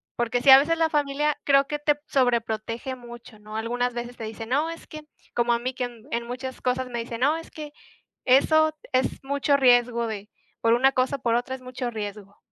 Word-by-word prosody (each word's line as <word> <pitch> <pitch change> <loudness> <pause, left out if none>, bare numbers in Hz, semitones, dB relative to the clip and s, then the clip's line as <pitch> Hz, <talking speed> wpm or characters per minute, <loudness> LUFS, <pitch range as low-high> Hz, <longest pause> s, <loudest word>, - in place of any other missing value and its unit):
porque 240 +1 -1
sí, 275 - +7
a 265 - +11
veces 330 +4 +1
la 325 -1 +2
familia 295 0 0
creo 275 -1 +4
que 295 +1 -3
te 295 0 +2
sobreprotege 235 -1 -1
mucho, 240 -3 -12
¿no?, 215 +1 -8
algunas 245 +2 -1
veces 240 +1 -5
te 225 - -6
dice: 220 +1 -7
"No, 285 +7 0
es 330 - -8
que" 310 - -9 0.3
como 240 0 +2
a 235 - 0
mí 255 +2 -3
que 250 0 -2
en 235 -2 -11
en 235 0 -2
muchas 255 +1 -6
cosas 255 0 -1
me 235 -1 -4
dice: 230 0 -5
"No, 285 +6 +2
es 330 - -10
que 300 -1 -8 0.5
eso 310 +4 +4 0.2
es 260 +1 0
mucho 280 +1 +1
riesgo 245 -3 +4
de 210 -1 -6 0.3
por 230 0 +4
una 265 +3 +4
cosa 255 +2 0
o - - -22
por 235 -2 +1
otra 245 +2 -2
es 260 - -12
mucho 255 -1 -5
riesgo", 205 -2 -7
250 Hz, 220 wpm, -25 LUFS, 235-275 Hz, 0.5 s, a